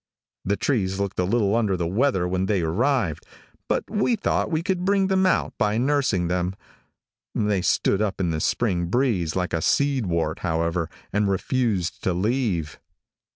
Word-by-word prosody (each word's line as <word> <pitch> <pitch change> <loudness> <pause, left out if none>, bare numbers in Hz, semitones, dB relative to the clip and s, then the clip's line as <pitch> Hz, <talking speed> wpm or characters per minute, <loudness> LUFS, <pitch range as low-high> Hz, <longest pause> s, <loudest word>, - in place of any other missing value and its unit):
The 100 +2 0
trees 95 -8 0
looked 100 -2 -2
a - - +3
little 105 0 +1
under 105 -5 +1
the 85 - -1
weather 95 0 +1
when 95 +1 -1
they 100 -3 +1
arrived, 105 - 0 0.4
but - - 0
we 210 +3 +1
thought 215 - 0
we 160 -1 -1
could 180 0 -1
bring 195 0 +2
them 190 0 +3
out - - +1
by 105 +1 +1
nursing 125 -9 +1
them. 90 +1 -1 0.8
They 105 -3 +1
stood 95 +3 +1
up 100 -2 -1
in 90 -3 0
the 80 - -2
spring 90 -6 0
breeze 100 - 0
like 90 -1 -1
a 80 - 0
seed 140 - +1
wart, 85 -2 -1
however, 85 0 -1 0.2
and 105 0 +2
refused 100 -2 -1
to 95 - +1
leave. 95 - -1
100 Hz, 170 wpm, -24 LUFS, 90-130 Hz, 0.8 s, a